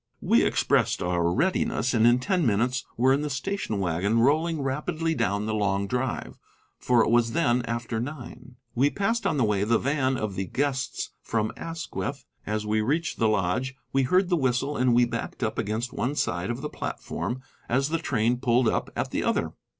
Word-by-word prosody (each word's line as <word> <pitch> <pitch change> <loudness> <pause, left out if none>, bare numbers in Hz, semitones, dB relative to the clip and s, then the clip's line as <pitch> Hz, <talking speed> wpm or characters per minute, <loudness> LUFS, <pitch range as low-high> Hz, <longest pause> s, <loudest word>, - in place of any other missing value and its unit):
We - - +4
expressed - - +2
our 85 -1 +1
readiness, 130 - +1
and 115 -1 +4
in 120 +1 +5
ten 180 +7 0
minutes 120 +2 +1
were 130 +3 +4
in 140 - +1
the 150 - -2
station 140 - -2
wagon, 95 +4 0
rolling 155 +5 +2
rapidly 155 +4 -1
down 105 -6 0
the 110 - -1
long 100 -2 0
drive, 125 +4 -3 0.4
for 120 -2 +3
it - - 0
was 115 -1 +3
then 125 -6 +2
after 115 -1 -2
nine. 125 -1 -7 0.2
We 135 +4 +3
passed 200 +5 0
on 160 - 0
the 130 - +3
way 105 -2 +1
the 115 +2 +3
van 135 -1 0
of 110 -3 -3
the 95 +1 -3
guests 135 +1 -2
from 110 -1 -1
Asquith. 165 -4 -5 0.2
As 105 0 -1
we 110 +1 +1
reached 150 +9 -1
the 110 - +3
lodge 110 +6 0 0.2
we 135 - +3
heard 180 +8 +2
the 180 - +3
whistle, 135 +1 0
and 125 -1 +3
we 120 0 +5
backed 120 -1 -5
up - - -1
against 110 +4 -2
one 135 +5 -1
side 90 -7 -1
of 120 +2 -3
the 150 - -3
platform 130 +2 -4 0.3
as 135 +4 +1
the 165 +1 0
train 120 -6 +1
pulled 120 0 +2
up - - 0
at - - -2
the - - -1
other. - - 0
125 Hz, 195 wpm, -26 LUFS, 110-140 Hz, 0.4 s, in